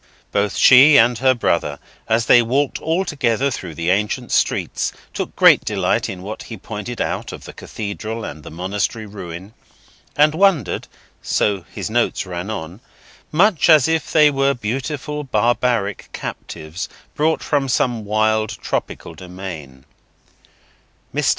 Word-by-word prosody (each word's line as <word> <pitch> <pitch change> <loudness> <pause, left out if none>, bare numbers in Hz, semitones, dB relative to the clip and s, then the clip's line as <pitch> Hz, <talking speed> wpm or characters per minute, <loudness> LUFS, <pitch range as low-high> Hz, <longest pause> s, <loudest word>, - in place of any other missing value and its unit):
Both 100 0 0
she 140 +3 +8
and 120 0 +5
her 130 0 +4
brother, 85 -10 0 0.3
as 115 0 +2
they 120 - +6
walked 135 +4 0
all 165 +4 0
together 135 - 0
through 90 -9 -6
the 85 +2 0
ancient 105 +2 -1
streets, - - 0 0.2
took - - -4
great - - +6
delight - - 0
in 90 -1 -7
what 105 +3 -6
he 115 - -8
pointed 110 +4 -7
out - - -2
of - - -9
the - - -10
Cathedral 110 +2 -6
and 75 - -8
the - - -10
Monastery 100 +6 -3
ruin, 95 -1 -9 0.6
and 150 +1 +4
wondered—so 120 - -1
his - - -5
notes 120 -3 0
ran 90 +2 -5
on—much 135 - -1
as 155 -5 +7
if 160 -2 -1
they 150 -2 +5
were 135 0 +1
beautiful 135 +6 -4
barbaric 120 -4 0
captives 80 +6 -6 0.2
brought 155 +2 0
from 140 -3 0
some 120 -2 0
wild 110 +1 +1
tropical - - -4
dominion. 90 -8 -9 1.3
Mr. - - +1
115 Hz, 135 wpm, -20 LUFS, 95-135 Hz, 1.3 s, she